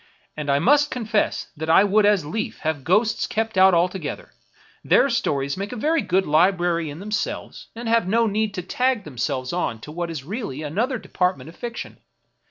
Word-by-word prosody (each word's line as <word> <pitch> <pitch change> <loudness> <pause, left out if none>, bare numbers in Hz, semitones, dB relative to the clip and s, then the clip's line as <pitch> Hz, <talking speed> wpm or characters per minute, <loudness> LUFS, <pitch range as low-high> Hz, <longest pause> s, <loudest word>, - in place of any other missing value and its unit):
And 150 -1 -5
I 140 - +4
must 290 - +4
confess 220 -4 -1
that 160 +1 -5
I 165 +4 +7
would 205 +1 +3
as 205 -7 +3
lief 215 +9 -4
have 155 -3 -2
ghosts 210 - +2
kept 225 0 -2
out 190 -1 +6
altogether; 175 -2 -2 0.5
their 275 - +4
stories 140 -11 0
make 200 +1 -4
a - - -5
very 310 +7 +1
good 190 -1 +1
library 170 0 +2
in 145 - -8
themselves, 210 +3 -4
and 235 +1 -6
have 230 -4 +2
no 230 +4 +3
need 215 -1 -1
to 180 - -4
tag 250 +3 0
themselves 130 -2 -3
on 145 -10 -2
to 150 - -9
what 170 +2 -4
is 155 -5 -5
really 165 - -5
another 225 - -1
department 180 - -2
of 165 - -14
fiction. 240 -1 -7
190 Hz, 185 wpm, -23 LUFS, 160-220 Hz, 0.5 s, I